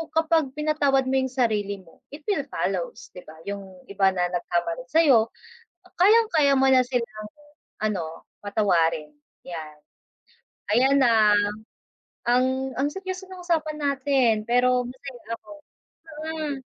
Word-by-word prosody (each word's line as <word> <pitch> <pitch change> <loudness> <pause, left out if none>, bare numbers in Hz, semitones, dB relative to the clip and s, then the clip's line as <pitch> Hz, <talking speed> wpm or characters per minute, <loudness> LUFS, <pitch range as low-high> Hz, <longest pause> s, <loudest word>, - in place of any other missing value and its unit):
kapag 320 -4 +2
pinatawad 290 -3 +2
mo 265 - 0
yung 260 -1 0
sarili 210 -6 0
mo 165 - -21
it 300 +1 -10
will 410 - 0
follows, - - -3
di 180 - -9
ba, 155 - -12
yung 195 -2 -7
iba 195 -1 +3
na 180 0 +1
nagkamali 175 +4 -2
sayo, 280 -9 +5 0.7
kayang-kaya 365 -9 +5
mo 265 - +4
na 255 -1 +6
silang 230 -4 -3 0.5
ano, 170 -7 -3 0.2
patawarin 165 -7 +1 0.3
yan. 155 -3 -7 1.0
Ayan, 270 +4 +4
ah, 215 -3 +5 0.9
ang 260 +2 +1
ang 275 +2 +1
seryoso 380 0 -6
ng 370 -1 -10
usapan 315 -3 -1
natin 275 -4 +2
pero 250 +1 +3
masaya 250 -2 -10
ako, - - -19 0.8
mm. 305 -3 -3
255 Hz, 125 wpm, -25 LUFS, 200-290 Hz, 1.0 s, na